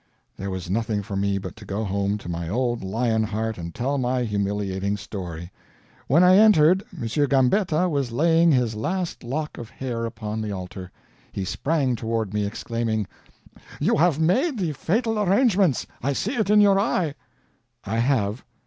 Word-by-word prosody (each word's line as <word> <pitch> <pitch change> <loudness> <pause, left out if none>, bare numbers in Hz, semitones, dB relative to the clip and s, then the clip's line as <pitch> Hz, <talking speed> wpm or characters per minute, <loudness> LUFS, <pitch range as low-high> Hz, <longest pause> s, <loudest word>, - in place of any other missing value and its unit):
There 100 +1 -5
was 95 -2 -5
nothing 105 +1 -1
for 100 - -6
me 100 0 0
but 100 - -6
to 110 - -11
go 100 +2 -3
home 100 0 -1
to 105 - -11
my 85 -1 -4
old 120 +2 -1
lion 110 +3 0
heart 110 -1 -2
and 85 0 -5
tell 135 - -1
my 125 0 0
humiliating 100 -2 -1
story. 90 -4 -7 0.6
When 160 +7 +5
I 185 +1 +7
entered, 190 -4 +6
M. 155 -11 -6 0.2
Gambetta 155 +6 +2
was 140 -7 -1
laying 165 +6 +4
his 125 -5 +2
last 175 - -3
lock 150 +6 -4
of 115 -2 -8
hair 120 -3 -4
upon 110 -1 -5
the 110 -1 -3
altar. 95 -1 -7 0.4
He 95 - -4
sprang 140 - 0
toward 110 -3 -2
me, 105 -1 0
exclaiming: 110 0 -2 0.7
"You - - +2
have 165 -1 +3
made 250 - +2
the 175 -6 -1
fatal 225 - 0
arrangements 200 - +3 0.2
I 140 +3 0
see 215 - -2
it 220 -6 0
in 210 0 +6
your 200 -1 +5
eye!" 180 -7 0 0.7
"I 110 +2 -2
have." 115 -3 0
120 Hz, 170 wpm, -24 LUFS, 100-165 Hz, 0.7 s, I